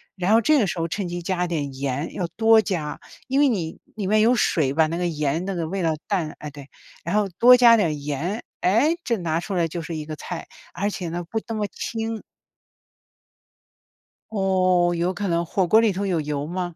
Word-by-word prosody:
然 185 +2 +1
后 225 - +6
这 305 +7 +4
个 220 - +3
时 175 - -3
候 165 - 0
趁 190 +2 -3
机 175 0 -4
加 180 +1 -1
点 150 -5 -3
盐， 140 +3 -3
要 180 - -2
多 225 0 +6
加， 170 -8 -3 0.3
因 270 +1 +1
为 290 -1 +5
你 175 -9 -3 0.2
里 205 -3 -3
面 215 +2 +3
有 230 +3 +5
水 155 - +1
吧， 160 +1 +3
那 165 - -3
个 180 - -1
盐 155 0 -1
那 195 - -2
个 170 -3 -3
味 190 +2 -3
道 160 -1 +2
淡 175 -7 -1
哎， 150 - -6
对， 140 -1 -12 0.3
然 - - -2
后 210 -1 +2
多 250 +1 +9
加 240 -2 +7
点 200 -6 +2
儿 155 - -2
盐。 150 - -3 0.2
诶， 255 - +3
这 235 -2 0
拿 165 -3 -1
出 195 +3 -5
来 170 -3 +1
就 165 +1 -5
是 165 +1 -5
一 155 -1 -5
个 155 0 -6
菜， 170 +2 -7 0.3
而 200 +2 -1
且 180 -4 -5
呢 175 +1 -4
不 220 - -1
那 225 - -4
么 210 -1 -1
清 225 +1 -4 2.1
哦， 185 -4 +2
有 175 +2 0
可 200 +2 -3
能， 170 0 0
火 185 +3 0
锅 215 +6 +6
里 225 -2 +3
头 200 +2 -2
有 180 -4 0
油 145 -1 -3
吗？ 175 +1 -4
180 Hz, 240 characters per minute, -23 LUFS, 160-210 Hz, 2.1 s, 多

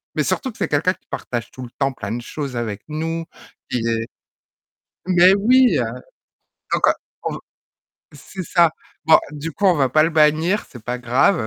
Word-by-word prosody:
mais - - +1
surtout 260 -4 -2
que - - -18
c'est - - -1
quelqu'un 150 +6 +2
qui - - -28
partage 120 -2 -4
tout 130 - -9
le 120 - -8
temps 135 -1 +1
plein 110 -3 -6
de 120 - -4
choses 140 0 -6
avec 110 -4 -3
nous, 165 +2 -3 0.4
qui 125 - -1
est 115 0 -1 1.0
mais 180 +1 +6
oui! 250 +5 +4
Heu, - - +1 0.9
donc - - +3
heu, - - +5 0.3
on - - -2
v - - -6 0.7
c'est 190 - -8
ça, 170 -1 +3 0.3
bon 160 - +7
du 150 +2 -6
coup 205 +4 0
on 180 - +5
va 135 -4 +1
pas 155 +3 +4
le 160 - +3
bannir, 160 +5 +3
c'est 120 -3 -12
pas 125 +2 -3
grave. 125 - +2
150 Hz, 195 wpm, -21 LUFS, 120-175 Hz, 1.0 s, bon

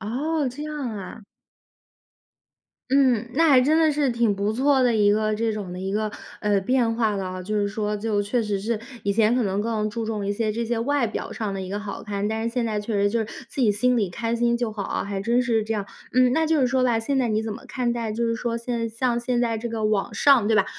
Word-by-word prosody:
哦， 285 +8 -1
这 260 +4 -7
样 305 0 -5 0.2
啊。 210 +1 -8 1.7
嗯， 255 -4 +3
那 325 +3 +4
还 265 -4 +7
真 295 +5 +3
的 315 -1 +4
是 290 -2 +1
挺 235 -4 +1
不 200 +2 0
错 270 +3 +3
的 245 -2 +3
一 205 -2 +4
个 215 +1 +1
这 225 +1 0
种 205 -4 -5
的 180 - -6
一 190 +1 -3
个， 215 +1 0 0.3
呃， 205 -2 +1
变 235 +2 +1
化 220 -3 +1
了。 185 -1 -4
就 210 +3 -2
是 205 - +1
说， 210 +1 -2
就 205 -1 0
确 220 +5 0
实 210 -3 -2
是 220 +2 -1 0.2
以 200 - +1
前 220 +2 +3
可 250 - +2
能 195 -1 0
更 215 -1 -1
注 225 0 -4
重 215 -2 -3
一 200 - 0
些 215 +1 -1
这 235 +2 -2
些 230 0 -1
外 280 +2 +1
表 220 - -4
上 215 -3 -3
的 195 - -4
一 185 - -6
个 205 +2 -3
好 205 -1 -6
看， 205 -1 -2
但 220 +1 -2
是 - - +1
现 245 -2 +1
在 215 -2 -1
确 210 +2 -4
实 200 0 +2
就 230 - 0
是 225 - 0 0.2
自 - - -5
己 220 -5 +4
心 250 +5 +2
里 210 -5 +1
开 230 +5 -2
心 235 0 +2
就 235 -2 -1
好 205 -2 -4
啊， - - -2
还 200 -1 -4
真 235 +5 +2
是 230 -3 +1
这 220 +1 -2
样。 205 -2 -2 0.3
嗯， 255 0 +4
那 320 +4 +2
就 315 -1 +2
是 255 - +3
说 260 0 +2
吧， 235 -3 +2
现 270 +4 -1
在 255 - +2
你 215 -1 0
怎 220 -1 -3
么 210 - -10
看 245 -2 -1
待 230 -2 -3
就 235 +2 -1
是 230 0 0
说 230 0 -2
现 235 +1 -3
在 230 - -1
像 235 +1 0
现 240 0 0
在 230 -2 0
这 235 +2 -4
个 225 -1 -3
网 215 -2 0
上， 270 -7 +5
对 220 - +3
吧？ 195 - +4
225 Hz, 290 characters per minute, -24 LUFS, 210-245 Hz, 1.7 s, 还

